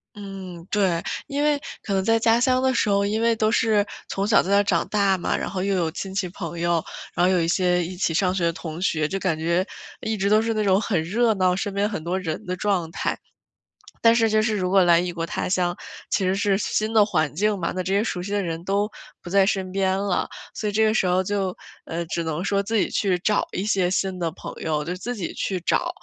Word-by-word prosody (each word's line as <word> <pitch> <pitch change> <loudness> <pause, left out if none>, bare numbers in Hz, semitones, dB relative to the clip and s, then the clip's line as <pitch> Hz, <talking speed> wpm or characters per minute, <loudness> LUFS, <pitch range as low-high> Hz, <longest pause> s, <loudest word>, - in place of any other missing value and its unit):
嗯， 190 -4 -8
对。 190 -5 +1 0.3
因 280 +1 -2
为 295 -1 +3 0.3
可 200 - -3
能 190 - +1
在 225 +3 +3
家 225 0 +4
乡 255 +1 +3
的 260 0 +2
时 225 - +1
候， 200 0 +3
因 215 +2 0
为 230 0 +3
都 215 0 +1
是 215 -3 +3 0.2
从 195 +1 -1
小 215 - +5
在 190 - -5
那 200 - +5
儿 205 - +4
长 200 - +1
大 200 -2 +2
嘛， - - -1
然 - - -3
后 185 -1 -3
又 195 0 +1
有 170 -3 +1
亲 190 +3 -6
戚 195 -1 -1
朋 170 -2 -6
友， 170 -1 +1 0.3
然 175 - +3
后 185 - +4
有 185 - +3
一 165 - 0
些 180 0 +2
一 180 +1 -6
起 175 -2 0
上 180 +2 +2
学 180 - -1
的 170 - +3
同 165 0 -7
学， 155 -5 +1
就 195 - -2
感 165 -5 0
觉 170 +3 +1 0.4
一 220 -1 -2
直 200 +1 +1
都 215 +1 +5
是 225 0 0
那 215 -1 0
种 190 0 +4
很 190 -9 0
热 220 +6 +2
闹， 185 -1 +2
身 195 +1 -3
边 200 +1 +1
很 200 -7 -5
多 180 +3 -1
人 160 -4 -4
的 180 0 -2
状 180 -5 0
态。 - - -2 0.9
但 230 - +8
是 225 -1 +3
就 215 0 +3
是 215 -1 0
如 180 -1 -1
果 190 -1 +5
来 170 -1 +5
异 180 0 -2
国 165 -1 -3
他 - - -3
乡， 180 -1 +1 0.4
其 195 - +1
实 185 +1 +2
是 200 -1 +2
新 215 +1 -1
的 210 -2 +6
环 155 -7 0
境 205 +4 +1
嘛， 170 - -2
那 185 - -2
这 190 +2 -2
些 200 - +3
熟 180 -6 -3
悉 200 +3 -5
的 200 -1 +1
人， 165 -1 -4
都 200 +2 +1 0.3
不 175 - -9
在 195 0 +4
身 190 -2 -1
边 190 0 +1
了。 195 -2 0 0.3
所 210 - -2
以 - - -5
这 220 +1 +3
个 215 0 +3
时 190 - +2
候 185 +1 +2
就， 195 -2 -1 0.3
呃， 170 +1 -3
只 170 - -2
能 160 +2 -3
说 200 0 +1
自 220 +3 -3
己 205 - +2
去 190 -3 +1
找 210 +3 +1
一 185 - -2
些 190 -4 +2
新 190 0 -1
的 170 -1 0
朋 - - -8
友， 150 -2 -1
就 175 +3 -3
自 245 +6 -4
己 190 -6 -4
去 190 - -2
找。 - - +1
190 Hz, 280 characters per minute, -24 LUFS, 175-210 Hz, 0.9 s, 但